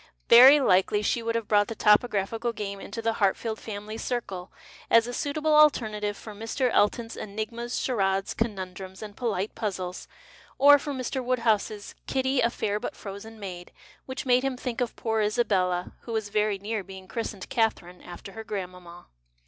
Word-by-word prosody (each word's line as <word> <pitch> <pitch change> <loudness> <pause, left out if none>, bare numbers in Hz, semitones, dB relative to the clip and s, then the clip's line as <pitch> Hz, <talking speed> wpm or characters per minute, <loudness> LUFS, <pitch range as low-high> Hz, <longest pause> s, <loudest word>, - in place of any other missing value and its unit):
Very 260 +5 +10
likely 205 -3 +3
she 235 - +1
would 230 0 -2
have 230 -2 -2
brought 205 -1 +3
the 225 - -5
topographical 220 +2 +2
game 200 -3 -5
into 230 - -7
the 225 0 +1
Hartfield 220 +3 +1
family 215 +1 -7
circle, 195 -7 -4 0.4
as 230 0 +6
a 245 - -5
suitable 305 +4 0
alternative 215 -9 +3
for 215 - -9
Mr. 225 +4 -1
FJton's 225 +3 +1
enigmas, 230 +4 -5
ciiaradcs, 195 -5 0
conundrums, 190 -3 -4
and 205 -1 -9
polite 215 -5 -2
puzzles, 185 -4 -4 0.5
or 285 +2 +8
for 290 - -5
Mr. 260 0 -3
Woodhouscs 225 -4 0
" - - -43
Kitty, 265 0 +1
a 235 - +3
fair 210 -3 -2
but - - -5
frozen 210 +3 -9
maid," 180 -3 -8 0.4
which 260 +2 -5
made 250 -1 +4
him 270 -1 -2
think 250 -1 -4
of 245 - -2
poor 220 -1 -1
Isabella 190 -5 +1
— - - -37
who 230 - -7
was 220 -2 -2
very 210 -1 +1
near 210 +1 -3
being 190 0 -11
christened 210 -3 -5
Catherine, 220 -7 -1
after 175 +2 -10
her 225 +2 -8
grandmanuna. 180 -4 -7
215 Hz, 175 wpm, -27 LUFS, 195-240 Hz, 0.5 s, Very